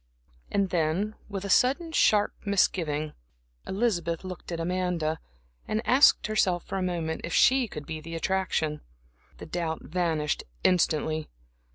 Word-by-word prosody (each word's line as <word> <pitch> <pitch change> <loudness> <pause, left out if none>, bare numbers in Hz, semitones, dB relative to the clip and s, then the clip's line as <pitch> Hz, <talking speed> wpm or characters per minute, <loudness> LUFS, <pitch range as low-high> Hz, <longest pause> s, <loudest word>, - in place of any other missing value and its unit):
And 195 -2 0
then, 175 +5 0 0.2
with 200 -1 -4
a - - -4
sudden, 285 - +3
sharp 210 -9 +3
misgiving, 160 -6 +1 0.5
Elizabeth 185 -6 -1
looked 185 -1 -8
at 170 - -3
Amanda, 170 -2 -1 0.5
and 220 +2 -2
asked 255 +6 +5
herself 195 -5 +1
for 195 - -3
a - - -2
moment 170 -3 -2
if 170 - -3
she 260 -1 +5
could 150 -7 -8
be 160 -1 -5
the 165 +1 -7
attraction. 165 -4 -1 0.6
The - - -9
doubt 160 -1 -3
vanished 160 -3 -1 0.2
instantly. 155 -3 +1
175 Hz, 140 wpm, -27 LUFS, 160-200 Hz, 0.6 s, asked